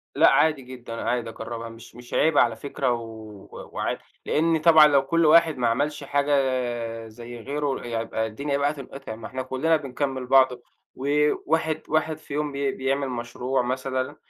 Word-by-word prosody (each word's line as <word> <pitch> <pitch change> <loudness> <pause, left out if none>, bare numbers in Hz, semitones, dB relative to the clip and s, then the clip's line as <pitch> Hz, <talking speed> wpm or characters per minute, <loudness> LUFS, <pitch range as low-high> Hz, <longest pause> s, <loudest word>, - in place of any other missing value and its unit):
لأ، - - +6
عادي 155 -3 +3
جدًا، 125 -2 -9
عادي 120 -2 -1
أجربها، 115 +1 -6
مش 115 +1 -13
مش 120 0 -12
عيب 160 -2 +3
على 115 -2 +4
فكرة، 135 -1 -2
و 110 -3 -9
وعادي. - - -2 0.3
لإن 165 +1 +2
طبعًا 160 -2 +8
لو 140 -2 +4
كلّ 165 +3 +2
واحد 160 -2 +5
ما 120 - +1
عملش 145 +6 -1
حاجة 145 +1 0
آآ 120 -4 -1
زَي 120 +2 -10
غيره، 140 +1 -3
يبقى 115 -1 -2
الدنيا 140 +6 -2
بقى 145 +1 +1
تنقطع، 135 -5 -8
ما 110 - -8
إحنا 130 0 -4
كلّنا 130 +6 +1
بنكمّل 135 -2 -3
بعض، 130 0 +6 0.5
وواحد 150 +3 +1
واحد 155 0 0
في 155 -2 -11
يوم 150 0 -1
بي 140 -1 -1
بيعمل 135 +1 -1
مشروع 125 +2 -2
مثلًا، 130 +2 -2
135 Hz, 170 wpm, -25 LUFS, 120-145 Hz, 0.5 s, طبعًا